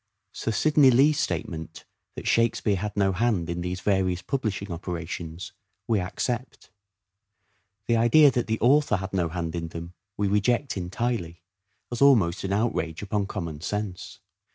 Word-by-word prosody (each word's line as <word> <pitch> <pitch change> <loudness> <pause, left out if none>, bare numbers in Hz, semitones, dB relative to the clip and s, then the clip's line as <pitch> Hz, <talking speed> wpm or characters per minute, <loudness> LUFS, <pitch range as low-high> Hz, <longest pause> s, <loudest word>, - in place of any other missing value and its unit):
Sir - - -4
Sidney 145 +4 +4
Lee's 140 +4 +4
statement 80 - -4 0.3
that - - -6
Shakspere 115 -3 +2
had 105 +2 -4
no 100 -1 +3
hand 95 -4 0
in 85 0 -3
these 90 +1 -4
various 95 -2 0
publishing 105 -4 -3
operations 85 0 -6 0.3
we 110 -3 +2
accept. 120 +7 -4 1.1
The 115 - +2
idea 140 +6 +6
that 120 - -1
the 110 0 -1
author 140 -1 +4
had 95 0 -5
no 90 -4 0
hand 85 -1 -4
in 85 -1 -3
them 85 +1 -8 0.2
we 105 - +1
reject[entirely, 100 - -1 0.5
as 120 - -4
almost 105 -11 +4
an 95 - -2
outrage 100 -6 -1
upon 105 -1 -1
common 85 -7 -5
sense. 105 -1 -4
100 Hz, 145 wpm, -26 LUFS, 90-120 Hz, 1.1 s, idea